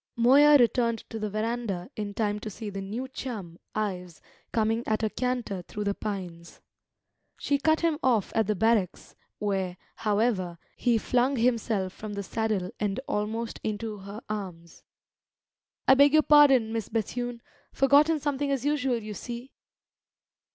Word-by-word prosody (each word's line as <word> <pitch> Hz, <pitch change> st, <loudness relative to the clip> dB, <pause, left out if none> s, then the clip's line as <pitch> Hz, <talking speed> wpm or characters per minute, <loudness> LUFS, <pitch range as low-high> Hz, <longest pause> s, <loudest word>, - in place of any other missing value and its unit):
Moya 280 Hz, +5 st, +7 dB
returned 235 Hz, -2 st, +2 dB
to 225 Hz, -, -4 dB
the 215 Hz, 0 st, -2 dB
verandah 215 Hz, -1 st, -3 dB
in 205 Hz, -1 st, -5 dB
time 210 Hz, -1 st, 0 dB
to 215 Hz, -, -6 dB
see 210 Hz, +1 st, -7 dB
the 195 Hz, 0 st, -5 dB
new 220 Hz, +7 st, -4 dB
chum, 215 Hz, -10 st, -7 dB, 0.2 s
Ives, 180 Hz, -5 st, -3 dB, 0.3 s
coming 225 Hz, 0 st, +1 dB
at 215 Hz, +1 st, 0 dB
a 215 Hz, -, 0 dB
canter 245 Hz, -6 st, -2 dB
through 210 Hz, +4 st, -6 dB
the 200 Hz, 0 st, 0 dB
pines. 180 Hz, -6 st, -6 dB, 0.8 s
She 285 Hz, -1 st, 0 dB
cut 315 Hz, +2 st, +2 dB
him 330 Hz, -3 st, +1 dB
off 235 Hz, -6 st, +2 dB
at 220 Hz, -2 st, +1 dB
the 210 Hz, -, +1 dB
barracks, 215 Hz, -2 st, 0 dB, 0.2 s
where, 190 Hz, -3 st, -2 dB, 0.2 s
however, 205 Hz, -5 st, 0 dB, 0.2 s
he 240 Hz, -2 st, +2 dB
flung 250 Hz, +4 st, +1 dB
himself 225 Hz, -6 st, 0 dB
from 215 Hz, -1 st, -7 dB
the 200 Hz, 0 st, -4 dB
saddle 210 Hz, -3 st, -2 dB
and 205 Hz, 0 st, -1 dB
almost 220 Hz, +2 st, -2 dB
into 215 Hz, 0 st, -3 dB
her 200 Hz, +3 st, -8 dB
arms. 180 Hz, -6 st, -7 dB, 1.1 s
"I -, -, +8 dB
beg 280 Hz, +2 st, +6 dB
your 310 Hz, 0 st, +6 dB
pardon, 275 Hz, -7 st, +6 dB
Miss 225 Hz, -3 st, -3 dB
Bethune! 235 Hz, +2 st, -3 dB, 0.3 s
Forgotten 295 Hz, +4 st, +4 dB
something 285 Hz, -1 st, -1 dB
as 275 Hz, -2 st, -1 dB
usual, 280 Hz, -4 st, +1 dB
you 210 Hz, 0 st, -6 dB
see!" 240 Hz, +4 st, -7 dB
220 Hz, 150 wpm, -27 LUFS, 205-250 Hz, 1.1 s, I